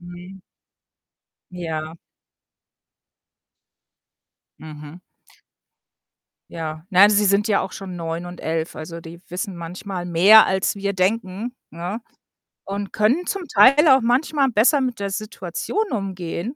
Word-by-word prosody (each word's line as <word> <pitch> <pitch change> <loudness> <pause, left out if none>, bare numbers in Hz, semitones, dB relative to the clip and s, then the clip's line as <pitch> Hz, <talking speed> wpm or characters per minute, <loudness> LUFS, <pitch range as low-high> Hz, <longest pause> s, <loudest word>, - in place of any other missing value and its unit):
mhm. 175 +2 -12 1.1
Ja. 160 -2 -5 2.6
Mhm. 155 +2 -11 1.5
Ja. 155 0 -6
Nein, 200 +1 +6
sie 210 0 +3
sind 200 +2 +2
ja 210 - +2
auch 190 - -5
schon 190 -2 -8
9 165 0 -4
und 175 0 -9
11, 160 0 -3
also 165 +2 -8
die 170 +1 -11
wissen 185 +2 -5
manchmal 175 +2 -6
mehr, 190 +6 +7
als 190 +1 0
wir 200 0 -2
denken, 195 +4 -1 0.2
ne, 175 +7 -5 0.7
und 200 0 -5
können 255 +12 +1
zum 395 -2 -3
Teil 290 +4 +5
auch 265 0 +6
manchmal 270 +4 +1
besser 250 +6 +3
mit 250 -4 -2
der 200 -1 -3
Situation 215 - -4
umgehen, 195 - -4
190 Hz, 120 wpm, -21 LUFS, 170-220 Hz, 2.6 s, mehr